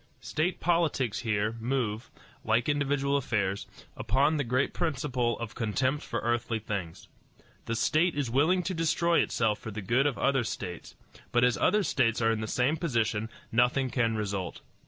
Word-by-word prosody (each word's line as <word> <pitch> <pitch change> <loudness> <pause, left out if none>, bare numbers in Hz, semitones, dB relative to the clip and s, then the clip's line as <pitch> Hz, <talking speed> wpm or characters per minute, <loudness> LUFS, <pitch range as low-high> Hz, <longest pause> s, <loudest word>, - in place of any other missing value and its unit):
State 170 +4 -1
politics 160 -9 +1
here 110 -1 0
move, 115 -2 -2 0.3
like 115 +1 +1
individual 140 -1 +1
affairs, 100 -7 -1 0.3
upon 145 +4 +2
the 145 - 0
great 125 +3 0
principle 130 -7 -1
of 115 -2 -6
contempt 130 +6 0
for - - -3
earthly 120 -1 0
things. 100 -6 -5 0.6
The 115 - -2
state 155 +9 +2
is 145 -3 -1
willing 160 +8 +3
to 185 - -2
destroy 170 +1 +2
itself 110 -2 +1
for - - -7
the 110 0 -5
good 125 +8 +2
of 140 - -2
other 135 -2 +2
states; 90 -5 -6 0.4
but 120 - +3
as 125 -1 +4
other 210 0 +2
states 115 - +1
are 115 -1 +3
in 110 -1 -1
the 110 - -3
same 130 +8 +1
position, 115 -8 0 0.2
nothing 125 +2 +2
can 115 -3 +1
result. 100 -4 -3
125 Hz, 165 wpm, -29 LUFS, 110-145 Hz, 0.6 s, as